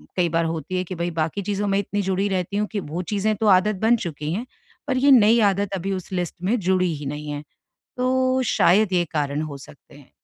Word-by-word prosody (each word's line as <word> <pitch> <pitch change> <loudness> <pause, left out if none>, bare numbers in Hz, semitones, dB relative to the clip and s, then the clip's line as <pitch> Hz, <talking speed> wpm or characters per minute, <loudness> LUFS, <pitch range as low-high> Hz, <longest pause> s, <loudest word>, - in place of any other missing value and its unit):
कई 175 -2 +1
बार 165 +1 +1
होती 165 +3 -3
है 185 - 0
कि 185 +1 -7
भई 170 +1 -2
बाकी 160 +6 -1
चीज़ों 205 +1 -2
में 195 - +1
इतनी 205 +1 -2
जुड़ी 190 +1 0
रहती 190 +1 -2
हूँ 210 0 0
कि 210 - -2
वो 165 +1 -5
चीज़ें 210 +1 +1
तो 215 +1 -1
आदत 195 +2 +4
बन 230 +2 +4
चुकी 150 -1 -4
हैं। 230 +6 -3 0.4
पर 260 -2 0
ये 280 +2 +4
नई 230 -2 +6
आदत 200 0 -3
अभी 195 +1 -3
उस 185 0 -6
लिस्ट 180 -2 -3
में 225 +6 +1
जुड़ी 185 -2 +1
ही 145 0 -8
नहीं 150 +2 -5
है। 145 0 -5 0.5
तो 255 +1 +1
शायद 195 +2 +4
ये 175 -1 +2
कारण 145 0 -1
हो 150 -3 -6
सकते 140 +1 -16
हैं। 145 -2 -17
185 Hz, 235 wpm, -23 LUFS, 165-210 Hz, 0.5 s, नई